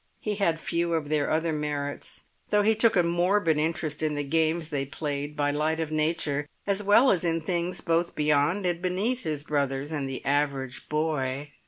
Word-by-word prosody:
He 210 -2 -3
had 170 -5 +1
few 170 0 0
of 150 -3 -2
their 150 -2 +1
other 160 +1 +1
merits, 145 -1 -4 0.3
though 210 0 +3
he 220 +2 +4
took 220 +1 +3
a 180 - +4
morbid 175 -1 +2
interest 155 -1 -2
in 155 -1 0
the 145 - -1
games 160 +2 0
they 140 -2 -1
played 145 0 -4
by 145 0 +1
light 155 +2 0
of 160 -1 -2
nature, 155 -2 0 0.2
as 200 0 0
well 210 +6 +5
as 180 -3 +1
in 165 -1 +1
things 175 +2 -2
both 170 +1 0
beyond 150 +6 +2
and 175 -1 0
beneath 200 +8 0
his 150 - -3
brothers 140 -1 -1
and 145 -3 -2
the 130 - -6
average 140 -2 -1
boy. 145 -2 -1
155 Hz, 190 wpm, -27 LUFS, 145-175 Hz, 0.3 s, well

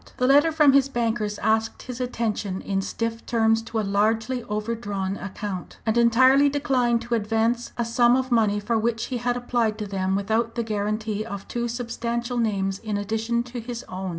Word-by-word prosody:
The 250 - +1
letter 290 +5 +5
from 300 -3 +5
his 275 0 +4
bankers 225 -4 -1
asked 220 +1 +1
his 250 0 -6
attention 220 -6 -2
in 195 -1 -1
stiff 230 +3 -3
terms 225 -1 +2
to 225 0 -3
a - - 0
largely 220 +5 +1
overdrawn 210 -3 -3
account, 195 -1 -6
and 220 -1 +1
entirely 260 +4 +5
declined 255 -4 +1
to 240 - -4
advance 225 +2 0
a 235 - 0
sum 240 +1 +4
of 260 0 -1
money 215 -3 +3
for 225 +2 0
which 225 0 -1
he 255 - -3
had 245 +1 -1
applied 240 -3 0
to 215 - -4
them 190 -1 -1
without 220 +4 0
the 235 - -1
guarantee 215 0 -2
of 200 -3 -7
two 240 0 -2
substantial 235 0 -3
names 195 -4 0
in 215 -2 -3
addition 225 +3 -1
to 245 0 -7
his 235 +1 -6
own. 185 0 -4
230 Hz, 185 wpm, -24 LUFS, 210-240 Hz, -, letter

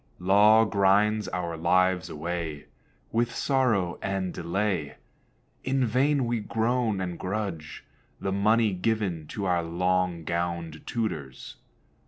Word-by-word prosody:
Law 105 +4 +5
grinds 105 +1 +2
our 85 -2 -3
lives 90 +1 +2
away 80 -1 -4 0.5
With 115 +1 0
sorrow 115 -11 +1
and 95 -2 -2
delay. 85 -3 -2 0.7
In 130 0 +1
vain 135 +4 +2
we 120 -1 -1
groan, 115 -1 0
and 90 -2 -4
grudge 95 -6 -4 0.4
The 95 - -2
money 105 +2 +3
given 95 -5 -1
to 100 +4 -4
our 90 -2 +2
long 90 0 0
gowned 85 -1 -3
tutors. 80 - -4
95 Hz, 115 wpm, -27 LUFS, 85-110 Hz, 0.7 s, Law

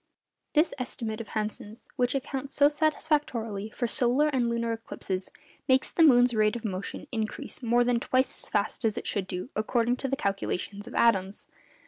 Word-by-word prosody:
This 310 +3 +3
estimate 230 -3 -3
of 225 - -9
Hansen's, 215 +1 -4
which 250 +1 +1
accounts 275 0 -3
so 285 0 +6
satisfactorily 295 -9 0
for 240 - -3
solar 250 +5 +3
and 250 -4 +1
lunar 235 0 -1
eclipses, 195 -4 -4 0.4
makes 260 0 +3
the - - +1
moon's 250 -5 +6
rate 215 0 +2
of 235 -1 -6
motion 195 -2 -4
increase 220 +1 -3
more 240 0 +3
than 240 -1 +2
twice 255 +2 0
as - - -7
fast 210 +3 -1
as 225 0 +1
it - - -4
should 195 -3 -2
do 185 +6 -5
according 235 +3 +1
to 270 - -3
the 275 - 0
calculations 200 -1 -3
of 245 - -9
Adams. 195 -4 +2
235 Hz, 175 wpm, -28 LUFS, 215-260 Hz, 0.4 s, so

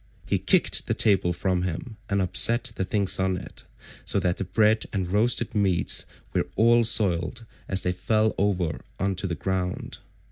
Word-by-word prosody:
He - - 0
kicked - - +2
the - - 0
table 95 -4 +3
from 90 +1 -1
him 90 +6 -5
and 100 -1 +1
upset 115 +6 +2
the 95 - -3
things 100 0 0
on 95 -1 0
it, 90 - -10 0.4
so - - 0
that 90 -1 -1
the - - -3
bread 110 +4 +2
and 95 -3 -2
roasted 115 +3 +1
meats 95 -5 +2 0.3
were - - 0
all 120 +1 +4
soiled 110 -1 +1 0.2
as 95 -1 +3
they 90 - 0
fell 110 +4 0
over 95 -5 -1 0.2
on 95 +1 0
to 95 - -2
the 85 - -3
ground. 90 +2 -4
95 Hz, 175 wpm, -25 LUFS, 90-110 Hz, 0.4 s, all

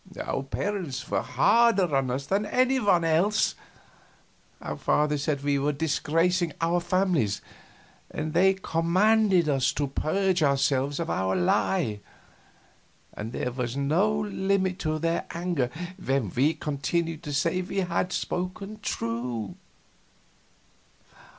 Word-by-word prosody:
Our - - -2
parents 160 - -4
were 95 -1 +1
harder 200 - +3
on 135 -1 +1
us 130 +3 -2
than 200 +5 0
any 255 +3 +2
one 190 -7 +3
else. 175 +7 +2 1.1
Our - - -5
fathers 150 -1 +1
said 140 -3 -1
we 145 -1 +1
were 145 +2 0
disgracing 165 +3 +1
our 170 +1 +1
families, 175 - +1 0.7
and 155 +1 -4
they 190 +3 +4
commanded 190 +2 +2
us 135 -3 +2
to 145 - -1
purge 180 +6 0
ourselves 140 0 +1
of 165 0 -2
our 95 0 0
lie, 105 - +1 1.1
and 110 +2 -6
there 125 - -3
was 125 0 -3
no 175 +10 +2
limit 190 -2 0
to 155 -1 -1
their 165 +2 -1
anger 170 -8 -1 0.3
when 135 -8 0
we 145 +6 +2
continued 155 +3 -2
to 150 -4 -6
say 165 +6 +1
we 195 +1 -2
had 180 0 -1
spoken 195 +5 -4
true. 115 - -3
165 Hz, 125 wpm, -26 LUFS, 140-185 Hz, 1.1 s, they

